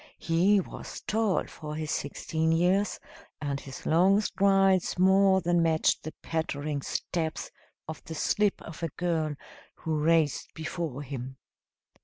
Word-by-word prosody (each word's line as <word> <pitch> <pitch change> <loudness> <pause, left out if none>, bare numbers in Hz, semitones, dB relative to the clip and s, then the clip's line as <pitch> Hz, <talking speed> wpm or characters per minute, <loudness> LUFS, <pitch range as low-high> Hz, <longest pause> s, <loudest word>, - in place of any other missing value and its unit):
He 180 +5 +3
was 185 - -7
tall 215 -3 0
for 150 -1 -8
his 155 0 -3
sixteen 160 +3 -1
years, 180 +5 +2 0.4
and 140 -2 -2
his 135 -1 -10
long 185 +5 +4
strides 195 -3 +2
more 190 +1 +5
than 175 0 +2
matched 160 -1 +2
the 155 - -7
pattering 150 -3 -2
steps 160 +2 -3 0.4
of 160 - -7
the 160 - -6
slip 205 +5 +1
of 165 - -10
a 165 - -1
girl 160 -4 0 0.4
who 160 -1 -2
raced 160 -2 +1
before 160 -3 -4
him. 130 -1 -7
165 Hz, 135 wpm, -28 LUFS, 155-190 Hz, 0.4 s, more